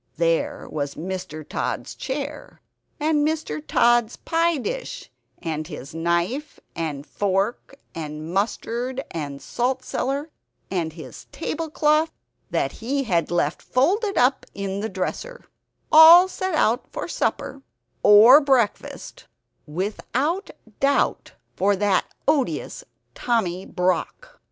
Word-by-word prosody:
There 165 -1 0
was 145 -2 -4
Mr. 180 -3 -6
Tod's - - -3
chair, 285 +2 -6 0.4
and 300 0 +2
Mr. 300 - -2
Tod's 240 +6 +3
pie 335 0 +1
dish, - - -5 0.3
and 155 -2 -4
his 150 -4 -9
knife 170 - -1 0.2
and 150 -4 -4
fork 200 +8 -1 0.2
and 155 0 -6
mustard 235 +6 -2
and 145 -4 -5
salt 255 - -2
cellar, 280 +5 -3 0.4
and 165 -4 -2
his 160 -1 -10
tablecloth, 310 0 0 0.4
that - - 0
he 275 +5 -2
had 175 -9 0
left 175 -3 0
folded 395 - +1
up 260 +2 +3
in 195 0 -3
the 220 +2 -3
dresser 485 - -5 0.5
all 330 +4 +10
set 375 -2 -3
out 240 -4 +2
for - - -4
supper 275 - -2 0.4
(or 230 +8 +8
breakfast) 260 -7 -1 0.4
without 240 - -2 0.3
doubt 280 0 +1 0.2
for 200 +2 +2
that 200 -1 +2 0.2
odious 300 - 0 0.3
Tommy 190 -7 -1
Brock. 185 - -2
230 Hz, 115 wpm, -23 LUFS, -, 0.5 s, all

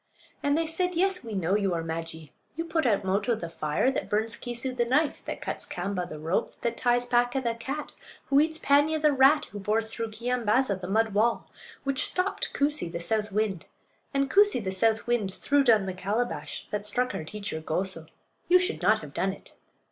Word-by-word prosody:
And 285 +1 +2
they 330 - +1
said: 360 +3 0
"Yes, 370 0 +1
we 225 -3 -6
know 190 0 +1
you 195 -4 +1
are 165 - -2
Maajee; 160 -2 -6 0.2
you 330 +2 -3
put 320 -4 0
out 205 -3 +2
Moto, 200 +5 +1
the 170 -6 -6
fire; 155 - 0
that - - -3
burns 220 +2 0
Keesoo, 245 +2 -4
the 240 - +2
knife; 270 +6 +1
that - - -5
cuts - - -4
Kaamba, 180 -1 -3
the 155 - -7
rope; 165 +8 -2
that 235 0 -1
ties 245 0 +2
Paaka, 245 +1 +2
the 235 -3 -1
cat; 265 +6 -5 0.3
who 275 - +4
eats 315 +1 +2
Paanya, 290 +2 +3
the 300 -1 +3
rat; 275 +3 +5
who 205 - -6
bores 220 +3 -1
through 230 -1 -3
Keeyambaaza, 230 -2 0
the 180 - -5
mud 220 +2 +1
wall; 230 +3 +1 0.3
which 275 -1 0
stopped 370 +2 -1
Koosee, 285 - 0
the 170 - -4
south 210 +5 -1
wind; 200 -4 -1 0.4
and 275 -1 +1
Koosee, 400 - +4
the 190 - -2
south 220 +4 +1
wind, 235 -5 0
threw 285 +8 +2
down 220 -6 +4
the 190 - -3
calabash 210 +6 -3
that 210 -1 -2
struck 250 +3 +2
our - - -4
teacher 200 -2 -5
Goso. 165 0 -3 0.4
You 360 - +7
should 365 +3 -1
not - - +3
have - - -10
done - - 0
it." - - -15
230 Hz, 205 wpm, -27 LUFS, 195-275 Hz, 0.4 s, You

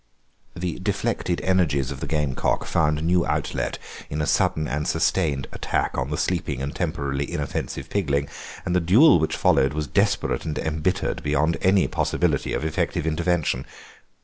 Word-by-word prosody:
The 85 -1 -3
deflected 90 -1 -1
energies 80 -8 +1
of - - -6
the - - -4
gamecock 75 -3 0
found 75 -2 +1
new 85 +1 +3
outlet 60 -5 -2 0.3
in 75 - -3
a 75 - +1
sudden 75 +1 +1
and 75 +2 -2
sustained 80 -4 +1
attack - - -1
on 65 +2 -2
the 75 - -2
sleeping - - -1
and 70 +4 -4
temporarily 70 -5 -2
inoffensive 70 -2 -3
pigling, 70 -8 0 0.4
and 90 - 0
the - - +5
duel 105 - +6
which 80 - 0
followed 70 +2 +3
was 75 -1 -1
desperate - - +1
and 75 - -3
embittered 80 +4 -1
beyond 75 +3 +1
any 95 0 +4
possibility - - 0
of 75 - -2
effective 80 0 -1
intervention. 80 -5 0
75 Hz, 155 wpm, -24 LUFS, 70-85 Hz, 0.4 s, duel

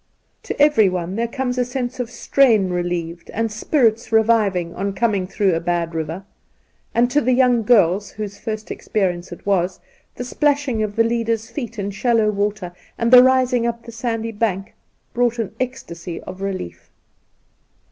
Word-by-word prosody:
To - - -6
everyone 195 - +3
there 230 +2 0
comes 250 0 -2
a - - +3
sense 250 0 -4
of 245 -2 -2
strain 235 -5 +3
re 180 0 0
lieved 170 -1 -4
and 225 0 -1
spirits 225 0 +1
reviving 210 -6 +2
on 200 +1 -3
coming 200 -3 0
through 195 -1 +1
a 165 - 0
bad 170 -1 -1
river, 165 +4 -4 0.7
and 235 +1 +4
to 295 +3 +3
the 255 +1 +2
young 250 -2 +4
girls, 205 -3 +3
whose 205 -1 -7
first 215 -1 -5
experience 180 -4 -2
it 175 - -10
was, 185 -2 0 0.4
the - - -5
splashing 280 -3 0
of 210 -1 -2
the 230 - +4
leaders' 230 -1 -1
feet 235 -5 -6
in 200 0 -3
shallow 220 0 +2
water, 205 -3 -2 0.2
and 230 +2 +1
the 250 - +11
rising 255 -2 +3
up 235 0 -4
the 235 - -10
sandy 230 -1 -3
bank, 205 -3 -2 0.4
brought 240 -1 +1
an 225 -4 -3
ecstasy 175 -10 -5
of 185 +1 -9
relief. 185 - -5
220 Hz, 165 wpm, -20 LUFS, 190-240 Hz, 0.7 s, the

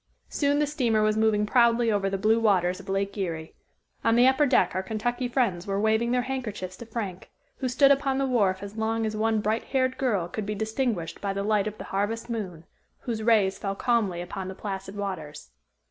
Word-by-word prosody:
Soon 285 -1 +1
the 300 - +3
steamer 245 -7 +1
was 215 0 +2
moving 220 -1 +2
proudly 235 0 +3
over 200 -2 +1
the 195 - -1
blue 220 +3 +3
waters 185 -4 +2
of 195 - -11
Lake 195 +1 -1
Erie. 165 -4 -4 0.5
On 225 +1 +3
the 240 +1 +6
upper 265 +3 +4
deck 255 - +3
our 185 - -1
Kentucky 240 +5 -2
friends 220 -8 0
were 195 0 -1
waving 220 +2 +2
their 250 0 +1
handkerchiefs 215 -8 -4
to 235 - -10
Frank, 205 -6 -5 0.3
who 260 - -2
stood 275 +3 +5
upon 275 -1 +2
the 275 - +1
wharf 200 -7 +1
as 200 +1 -8
long 225 0 0
as 215 0 -2
one 220 0 +1
bright 215 +2 -1
haired 260 -1 0
girl 210 -10 +1
could 205 +3 -5
be 210 - -2
distinguished 220 -4 -2
by 200 -1 -1
the 200 0 -2
light 210 -1 +1
of 215 0 -5
the - - -7
harvest 220 +4 -1
moon, 180 -8 -5 0.4
whose 230 -3 -3
rays 215 -4 +3
fell 195 -1 -3
calmly 210 -7 0
upon 185 +2 -6
the 190 - -6
placid 195 -1 -6
waters. 165 -7 -6
215 Hz, 210 wpm, -26 LUFS, 195-240 Hz, 0.5 s, the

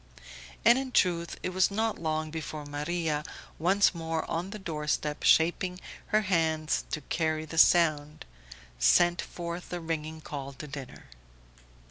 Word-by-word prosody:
And 235 +2 +7
in 265 -1 -5
truth 170 -6 +1
it - - -1
was 185 0 +2
not 220 +2 -1
long 155 -1 -2
before 155 -1 -6
Maria, 150 +1 -2 0.4
once 190 +5 +3
more 165 -1 -3
on 170 +3 -3
the 215 - -6
door 155 -6 -5
step, 150 0 -1
shaping 180 +3 +3 0.3
her 215 0 +3
hands 160 -5 0
to 155 - -3
carry 155 +1 -1
the 160 +1 -2
sound, 155 -4 +4 0.5
sent 170 - +4
forth 170 0 -6
the 175 - -4
ringing 160 -1 -4
call 140 -3 -7
to 145 - -9
dinner. 140 -3 -9
160 Hz, 145 wpm, -29 LUFS, 155-175 Hz, 0.5 s, And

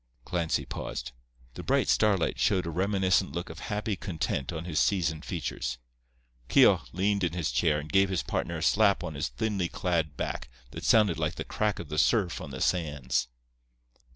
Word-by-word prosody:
Clancy 85 -3 -1
paused. - - -5 0.4
The - - -7
bright - - +1
starlight 100 -5 +2
showed 95 -3 +2
a 85 - -3
reminiscent 95 +1 +1
look 85 0 -4
of 80 - -10
happy 105 0 -1
content 85 -7 -3
on 80 0 -5
his 85 -3 -1
seasoned 80 -5 +1
features. 65 -7 -3 0.7
Keogh - - +6
leaned 100 +2 0
in 85 -2 0
his 85 -8 -1
chair 75 +5 +2
and 75 +1 -6
gave 95 0 +5
his 95 -3 -1
partner 85 - -2
a 80 - -4
slap 100 -3 +3
on 85 -3 -4
his 75 +2 -2
thinly 100 -6 -2
clad 85 -6 -1
back - - -4 0.2
that - - -7
sounded 105 -7 +4
like 75 +1 -1
the - - -4
crack 105 -2 -1
of 80 - -7
the 75 0 -1
surf 100 -6 +2
on 80 - -7
the 65 -1 -7
sands. 70 -8 0
85 Hz, 180 wpm, -28 LUFS, 75-95 Hz, 0.7 s, Keogh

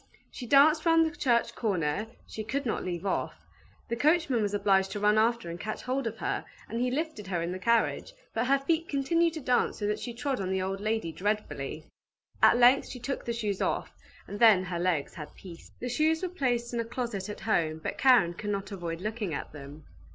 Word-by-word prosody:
She 245 - -8
danced 305 +4 +6
round 330 -1 +5
the 320 +1 -3
church 240 -8 +1
corner, 190 -2 -1 0.2
she 220 - -6
could 280 +6 -3
not 225 - -1
leave 175 0 -4
off; 195 - -1 0.5
the 235 - -2
coachman 300 -2 +2
was 205 -1 0
obliged 195 -1 +3
to 205 - -3
run 210 +1 +4
after 230 -1 +1
and 170 +1 -6
catch 215 +3 -5
hold 255 0 -1
of 225 0 -5
her, - - -2 0.2
and 230 - -4
he 250 - +1
lifted 295 -6 -3
her 180 -3 -1
in 170 - -3
the 185 - -5
carriage, 230 - +1 0.2
but 225 +2 0
her 275 +1 +4
feet 320 +4 -1
continued 330 +4 +1
to 315 - -5
dance 250 -2 +1
so 205 - -3
that 210 0 -1
she 240 -2 -6
trod 255 -1 -2
on 185 - -2
the 190 0 0
old 190 +1 -2
lady 215 -5 -1
dreadfully. 180 -7 -3 0.6
At - - +6
length 250 +3 +5
she 250 - -8
took 265 +3 -4
the 235 - -1
shoes 210 -4 -2
off, - - -1 0.4
and 205 - -7
then 220 -5 +6
her 180 -2 -4
legs 170 -5 0
had 150 -4 -9
peace. 175 -3 -12
The 250 - -4
shoes 310 +7 +1
were 365 - -1
placed 245 -8 -1
in 235 - -1
a 230 - -1
closet 235 -5 -4
at 210 - -7
home, 165 -8 +1
but 160 - -5
Karen 245 -10 +5
could 205 +4 -6
not 200 0 -3
avoid 170 -3 -5
looking 210 -5 -3
at - - -6
them. 145 +1 -11
220 Hz, 225 wpm, -29 LUFS, 190-255 Hz, 0.6 s, danced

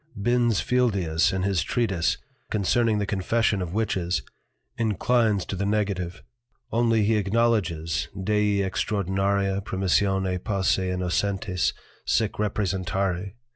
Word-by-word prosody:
Bins 120 0 +2
Fieldius 100 -10 +2
in 95 0 -1
his 95 -3 +1
Treatise, 100 -8 0 0.3
concerning 110 +2 +2
the 105 - 0
Confession 100 +1 0
of 90 +1 -4
Witches, 95 -5 0 0.5
inclines 110 -1 +1
to - - -4
the 95 - -2
Negative, 100 -4 -1 0.5
only 115 -1 +2
he 110 +1 +2
acknowledges 95 -7 0
_Dei 105 +1 +1
extraordinaria 100 0 0
Permissione 95 -1 0
posse 95 -2 +1
Innocentes 90 +1 0 0.3
sic 110 -2 +1
representari. 95 -2 -1
100 Hz, 105 wpm, -25 LUFS, 95-110 Hz, 0.5 s, Bins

